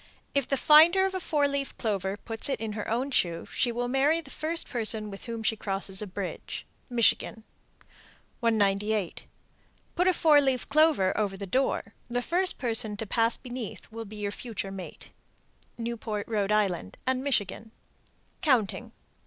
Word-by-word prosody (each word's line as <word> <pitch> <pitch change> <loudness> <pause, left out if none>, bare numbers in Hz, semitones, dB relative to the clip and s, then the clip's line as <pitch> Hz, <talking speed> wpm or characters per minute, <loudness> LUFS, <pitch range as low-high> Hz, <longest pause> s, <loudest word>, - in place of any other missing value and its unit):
If 280 -3 +1
the 275 - +1
finder 330 +7 +7
of 385 - -1
a 375 - -2
four 300 -5 +1
leaved 280 -1 -3
clover 200 -3 -1
put 225 +4 -2
it 270 - -1
in 225 -1 -3
her 210 -1 -4
own 250 +5 -1
shoe, 170 -9 0
she 240 - +2
will 245 +1 -2
marry 275 +6 +3
the 330 - -10
first 330 +2 -1
person 220 -3 0
with 195 - -9
whom 230 -2 -5
she 225 - +2
crosses 195 -2 0
a 210 - -4
bridge. 190 0 -5 0.2
Michigan. 230 -2 +1 1.0
198. 210 -3 0 0.7
Put 360 +1 +2
a 370 - +5
four 305 -4 +5
leaved 265 -3 0
clover 300 -11 +4
over 200 -2 -1
the 200 - -5
door. 225 -1 0 0.2
The 245 +1 -1
first 365 +5 +1
person 225 -4 0
to 220 - -3
pass 230 +3 +2
beneath 245 -4 -7
will 225 0 -6
be 215 +1 -10
your 205 -1 -3
future 205 -3 -5
mate. 190 -2 -9 0.7
Newport, 230 -3 -4
R.I., 205 - +1 0.2
and 260 0 0
Michigan. 220 -5 -1 0.7
COUNTING. 245 -10 +1
230 Hz, 160 wpm, -28 LUFS, 205-275 Hz, 1.0 s, finder